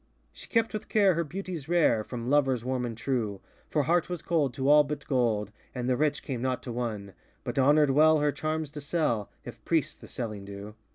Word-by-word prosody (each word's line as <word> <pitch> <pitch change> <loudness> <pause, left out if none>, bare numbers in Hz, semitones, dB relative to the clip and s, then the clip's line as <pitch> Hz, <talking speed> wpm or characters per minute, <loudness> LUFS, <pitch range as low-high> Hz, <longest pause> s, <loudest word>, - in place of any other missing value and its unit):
She - - -12
kept 230 -1 +1
with 215 0 -5
care 200 -3 +4
her 170 +1 0
beauties 170 -2 -6
rare 155 -11 +3
From 120 +1 -6
lovers 135 -4 +2
warm 130 -1 -1
and 115 -2 -6
trueŌĆö 115 -6 -2 0.3
For 150 - +1
heart 170 +4 +1
was 175 -3 -4
cold 155 -6 +1
to 135 +2 -1
all 150 +1 +7
but 150 +1 -5
gold, 115 -6 0 0.2
And 125 -1 -3
the 130 - +2
rich 150 +2 0
came 125 -4 -4
not 130 -1 -1
to 125 - -5
won, 110 -5 -4 0.3
But - - -5
honorŌĆÖd 145 +2 +5
well 155 +3 +5
her 150 0 +2
charms 155 0 -3
to 150 -1 -7
sell. 145 - -1 0.2
If - - -10
priests - - 0
the - - -13
selling 110 -5 -5
do. 100 +1 -8
135 Hz, 215 wpm, -28 LUFS, 120-155 Hz, 0.3 s, all